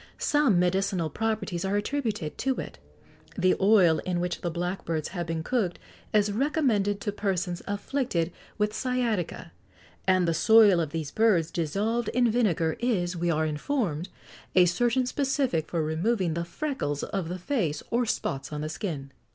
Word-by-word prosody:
Some 290 -10 +3
medicinal 180 -2 +1
properties 215 -5 -2
are 195 +1 0
attributed 210 - -2
to 265 0 +1
it; - - -7 0.6
the 185 -1 +3
oil 190 -5 +5
in 180 -1 -2
which 175 0 -2
the 175 - -1
blackbirds 170 -2 -3
have 175 -2 -4
been 165 -1 -2
cooked 205 -5 0 0.3
is 210 -1 +3
recommended 220 -5 +1
to 205 - -1
persons 190 -3 -2
afflicted 200 -4 -1 0.3
with 210 0 0
sciatica: 235 - -2 0.6
and 185 -2 +4
the 165 - +2
soil 210 +1 +6
of 160 -3 -1
these 155 -2 -4
birds, 190 -8 +3
dissolved 205 +8 -1
in 245 -2 +4
vinegar, 175 -9 +1
is, 185 -8 0
we 175 0 -1
are 160 -1 +1
informed, 170 - -2 0.5
a 180 -1 +7
certain 240 +8 +2
specific 265 - 0
for 165 -2 -1
removing 170 +3 0
the 170 +1 -2
freckles 170 - -3
of 190 -5 -3
the 180 - -3
face 180 - -1
or 240 0 +1
spots 135 -8 -2
on 150 0 -4
the 155 - -3
skin." 150 -5 -5
190 Hz, 160 wpm, -27 LUFS, 165-225 Hz, 0.6 s, a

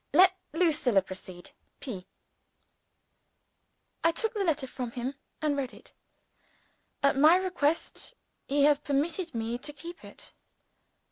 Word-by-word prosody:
Let 370 +4 +7 0.2
Lucilla 300 - +3
proceed. 185 -1 -8 0.3
P.] 195 -10 -6 2.0
I 330 - +5
took 445 +7 0
the 415 -3 0
letter 310 -6 +1
from 250 -1 -5
him 255 +2 -3 0.3
and 300 -2 +2
read 270 -2 -3
it. - - -14 1.1
At 280 0 +4
my 310 +4 +8
request, 365 +4 0 0.3
he 280 +1 +2
has 290 -1 +5
permitted 310 +3 -1
me 230 +1 -2
to 295 - -3
keep 335 +4 -10
it. - - -11
290 Hz, 125 wpm, -29 LUFS, 250-335 Hz, 2.0 s, my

